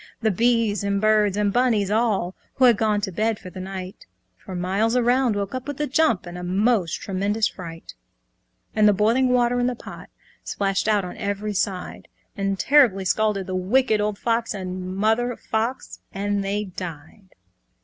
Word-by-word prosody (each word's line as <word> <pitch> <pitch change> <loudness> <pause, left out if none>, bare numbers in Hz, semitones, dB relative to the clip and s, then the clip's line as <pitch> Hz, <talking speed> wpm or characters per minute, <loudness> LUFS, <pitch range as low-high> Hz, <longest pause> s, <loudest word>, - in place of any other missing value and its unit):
The 220 - +3
bees 225 -1 +1
and 200 0 0
birds 210 -1 +3
and 205 -1 +1
bunnies 225 -6 +2
all, 210 -5 +1 0.2
Who 260 - +4
had 240 -2 +6
gone 210 -1 +1
to 200 -2 -3
bed 215 +4 0
for 185 -2 -11
the 185 - -9
night, 185 0 -7 0.3
For 190 - -9
miles 195 +6 0
around, 245 -1 +2
woke 200 +1 -3
up 255 +1 -5
with 290 -1 -5
a 300 - +1
jump 285 - +1
In 175 0 -8
a 180 - -6
most 190 0 +1
tremendous 205 +3 0
fright. 165 -3 -9 0.8
And 215 -1 +5
the 210 - +5
boiling 230 +6 +2
water 245 0 +2
in 245 - +1
the 250 - -1
pot - - -11 0.3
Splashed 195 0 -1
out 210 -3 +2
on 180 - -8
every 205 +1 -3
side, 190 -1 -3 0.3
And 195 0 -1
terribly 240 -8 +4
scalded 210 0 +1
the 185 - -5
Wicked 215 +4 +2
Old 210 -1 -1
Fox, 230 0 -1
And 185 -1 -5
Old 185 +1 -5
Mother 225 +4 +1
Fox, 225 +4 -3
and 200 0 -1
they 200 +2 -1
died. 180 0 -9
210 Hz, 180 wpm, -23 LUFS, 190-230 Hz, 0.8 s, had